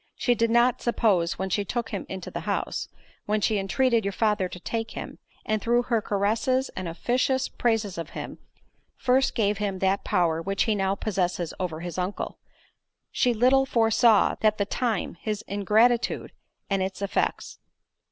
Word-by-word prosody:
—She 245 - +2
did 230 0 +1
not 240 +2 +3
suppose 195 -8 +1
when 190 +1 -3
she 205 +3 +1
took 235 +3 -3
him 200 - -4
into 190 -2 -6
the - - -4
house; - - -2 0.4
when 210 +1 +1
she 210 0 +1
intreated 230 +4 +2
your 200 - -1
father 210 -2 +1
to 180 - -9
take 225 +5 -4
him; - - -7 0.3
and 215 -1 0
through 240 +2 +2
her 235 -3 0
caresses 225 +7 0
and 185 -1 -6
officious 255 +9 0
praises 220 -6 -1
of 165 -1 -5
him, - - -6 0.6
first 260 +1 +2
gave 210 -3 +1
him 200 -2 -2
that 190 +1 +1
power 170 -5 +1
which 195 +3 0
he 220 - +1
now 195 -1 0
possesses 180 -5 -2
over 170 -4 -3
his 175 0 -5
uncle; 180 +3 -4 0.7
she 250 - +2
little 255 +4 +3
foresaw, 225 -2 +4
at 215 -1 +3
that 200 -1 -1
time, 225 -8 -1
his 215 -1 -3
ingratitude, 220 +4 +2 0.4
and 195 -1 0
its 190 +1 -3
effects." 200 - -2
210 Hz, 170 wpm, -26 LUFS, 190-235 Hz, 0.7 s, foresaw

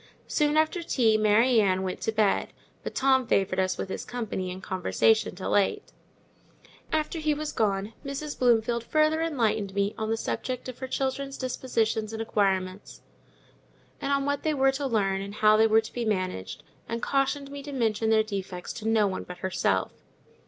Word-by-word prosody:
Soon 300 0 +1
after 315 +3 +2
tea, 235 -9 +2
Mary 220 +3 +4
Ann 190 -2 +1
went 185 -1 -4
to 225 - 0
bed, 215 -2 +2 0.3
but - - -6
Tom 265 -2 +3
favoured 190 -3 +1
us 185 0 +1
with - - -4
his - - -4
company 220 -6 -4
and 185 +1 -8
conversation 190 +4 +1
till 185 - -2
eight. 205 - +1 1.0
After 315 +1 -1
he 305 -1 +1
was 305 +1 -4
gone, 205 0 0
Mrs. 280 +1 -5
Bloomfield 235 -2 +2
further 310 +4 +2
enlightened 225 -10 0
me 200 +1 +1
on 220 0 -2
the 225 - 0
subject 255 +2 -3
of 255 - -8
her 260 - -4
children's 275 +1 -2
dispositions 225 -4 -1
and 220 - -5
acquirements, 195 -3 -1 1.0
and 275 - -1
on 275 0 +1
what 285 0 -1
they 310 -1 0
were 270 -1 +4
to 275 +1 -2
learn, 195 -5 +1
and 200 +1 -7
how 215 0 +5
they 220 +1 +5
were 220 0 +5
to 220 - -11
be 240 - -2
managed, 185 - -2 0.3
and 230 0 -3
cautioned 275 0 0
me 285 0 -6
to 285 +1 -8
mention 225 -4 0
their 220 -1 +4
defects 195 -4 -5
to 220 -1 -6
no 220 -2 +4
one 190 -2 -2
but 180 - -9
herself. 190 - 0
225 Hz, 185 wpm, -27 LUFS, 200-275 Hz, 1.0 s, how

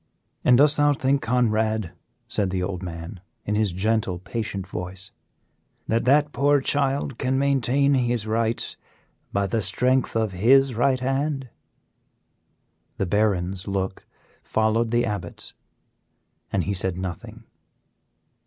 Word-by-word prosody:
"And 125 -1 +6
dost 145 +2 +5
thou 145 0 +4
think, 135 0 +1
Conrad," 110 -5 +1 0.4
said 100 -3 -1
the 90 -1 -1
old 90 -1 -3
man, 85 0 -7 0.2
in 105 - -1
his 105 -2 +1
gentle, 100 0 0
patient 100 0 -4
voice, 95 +1 -6 0.8
"that 115 +1 +1
that 145 +3 +4
poor 145 0 +3
child 135 -2 0
can 130 -1 0
maintain 140 0 +2
his 120 -4 +1
rights 115 +1 -1 0.5
by 100 0 0
the 110 +3 -1
strength 130 +4 +1
of 110 -2 +1
his 130 +8 +4
right 130 +3 +2
hand?" 135 0 -1 1.5
The 95 - 0
Baron's 95 -1 0
look 95 -1 -3 0.3
followed 110 +1 +1
the 120 +1 +2
Abbot's, 105 -3 -5 1.0
and 95 - +1
he 100 - -1
said 95 -2 -1
nothing. 90 -2 -6
110 Hz, 125 wpm, -24 LUFS, 95-130 Hz, 1.5 s, And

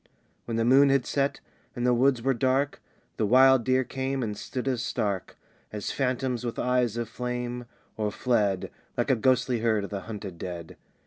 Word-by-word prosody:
When 115 -1 -3
the 115 - +1
moon 135 +3 +6
had 135 -2 +2
set, 140 0 -1 0.3
and 120 -1 -2
the 125 - +4
woods 125 -1 +2
were 135 +1 +3
dark, 135 +3 0 0.4
The 110 - +1
wild 130 +2 +6
deer 130 +2 +2
came, 135 +1 -2
and 105 -2 -3
stood 125 +5 -5
as 125 -3 0
stark 105 -6 -2 0.3
As 105 -2 -4
phantoms 130 -2 -1
with 120 -2 -4
eyes 125 -2 +1
of 120 -1 -2
flame; 125 +1 -4 0.3
or 105 -1 -1
fled 105 -6 0 0.3
Like - - +1
a - - +4
ghostly 125 +1 +2
herd 110 -2 +1
of 100 - -7
the 100 -1 -3
hunted 100 -6 -7
dead. 85 -3 -6
125 Hz, 185 wpm, -27 LUFS, 110-130 Hz, 0.4 s, moon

